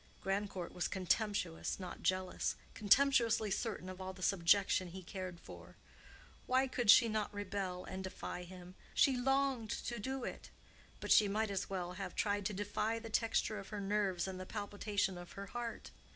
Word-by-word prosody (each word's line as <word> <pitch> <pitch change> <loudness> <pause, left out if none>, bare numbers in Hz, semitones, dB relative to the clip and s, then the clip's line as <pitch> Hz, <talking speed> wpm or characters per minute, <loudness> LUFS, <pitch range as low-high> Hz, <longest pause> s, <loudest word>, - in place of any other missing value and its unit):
Grandcourt 195 -2 -2
was 180 - -1
contemptuous, 190 -2 0
not 185 -2 -7
jealous; 185 0 0 0.2
contemptuously 230 -1 +4
certain 205 -3 -2
of 185 0 -7
all 190 0 -4
the 185 0 -9
subjection 185 0 +3
he 185 +2 -8
cared 185 -1 -6
for. - - -12 0.7
Why 260 +1 +4
could 245 -4 -2
she 235 +2 +9
not 215 -2 -1
rebel 195 -3 -3
and 190 0 -5
defy 185 -1 -5
him? 180 0 -10 0.2
She 270 - +5
longed 265 -2 +1
to 235 +1 -3
do 265 +4 -3
it. - - -6 0.5
But - - -3
she 210 - +7
might 215 +1 0
as 195 - -2
well 180 -2 -3
have 195 +1 -6
tried 205 -2 +1
to - - -4
defy 210 +3 -1
the 225 0 -8
texture 225 -1 +1
of 195 - -9
her 210 - -4
nerves 195 -3 0
and 185 -1 -5
the 185 - -7
palpitation 205 -3 -2
of 175 - -10
her 200 - -6
heart. 235 +3 -5
200 Hz, 175 wpm, -36 LUFS, 185-220 Hz, 0.7 s, she